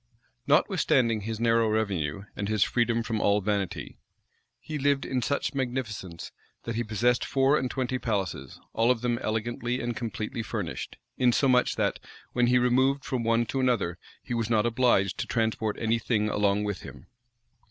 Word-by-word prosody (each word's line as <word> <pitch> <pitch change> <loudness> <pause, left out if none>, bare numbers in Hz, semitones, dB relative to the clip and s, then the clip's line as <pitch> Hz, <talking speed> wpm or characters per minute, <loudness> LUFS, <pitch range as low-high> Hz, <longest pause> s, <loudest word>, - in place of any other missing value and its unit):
Notwithstanding 115 -4 +3
his 110 +1 -4
narrow 115 -1 +3
revenue, 100 -6 -1
and 100 0 -3
his 110 -2 +3
freedom 115 -1 +1
from 115 -1 -2
all 100 +1 +3
vanity, 100 -2 -3 0.6
he 155 -1 -5
lived 140 0 +1
in 130 -1 -1
such 140 +5 -1
magnificence, 120 -10 -4 0.3
that 115 - -3
he 115 +2 -1
possessed 120 +3 +1
four 135 +1 +3
and 130 -4 0
twenty 130 0 -2
palaces, 100 -7 -3
all 115 +1 +2
of 125 -3 +2
them 120 -1 0
elegantly 120 +3 -2
and 120 0 -3
completely 110 -1 -4
furnished; 110 - -5 0.2
insomuch 125 0 +3
that, - - 0 0.3
when 120 0 +3
he 125 +1 +4
removed 130 +2 +2
from 125 -3 -2
one 115 +1 +2
to 135 - -3
another, 120 -10 0 0.2
he - - -5
was 115 -2 -1
not 110 -1 +3
obliged 120 -5 +2
to - - -2
transport 110 -2 -1
any 115 0 +1
thing 105 -2 0
along 105 0 +1
with 105 -3 -3
him. 60 - -11
115 Hz, 165 wpm, -27 LUFS, 105-125 Hz, 0.6 s, he